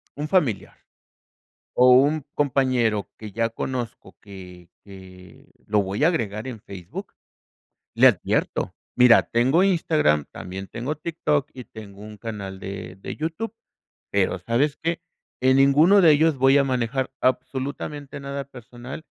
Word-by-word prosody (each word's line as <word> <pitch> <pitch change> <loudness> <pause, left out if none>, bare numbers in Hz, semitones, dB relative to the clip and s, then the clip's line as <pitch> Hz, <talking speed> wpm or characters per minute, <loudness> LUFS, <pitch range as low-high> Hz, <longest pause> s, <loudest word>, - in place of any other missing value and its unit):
un 150 +1 -4
familiar, 150 - 0 1.0
o 125 +1 +6
un 140 +3 +4
compañero 130 -7 +1
que 105 -2 -9
ya 115 +1 0
conozco 115 -4 -6
que 90 -4 -12 0.2
que 95 -2 -15 0.2
lo 105 -1 +2
voy 100 +8 -1
a 165 - +6
agregar 110 - -2
en 115 -5 -7
Facebook, 95 -6 -9 0.8
le - - +6
advierto. - - -1 0.2
Mira, 125 -2 +6
tengo 130 +10 +2
Instagram, 155 - +2
también 95 +2 -8
tengo 125 +9 -4
TikTok 150 -3 -1
y 125 - -9
tengo 105 -3 -12
un 105 0 -11
canal 100 -3 -7
de 95 -2 -7
de - - -7
YouTube, 165 +9 -4 0.6
pero, - - +1
¿sabes 140 +5 0
qué? 165 +1 -1 0.4
En 130 +1 +3
ninguno 150 +9 +5
de 165 -4 +7
ellos 155 0 +3
voy 135 +2 +5
a 140 - +4
manejar 130 +1 -1
absolutamente 135 +3 -3
nada 140 0 -5
personal 125 +3 -11
125 Hz, 140 wpm, -23 LUFS, 105-145 Hz, 1.0 s, de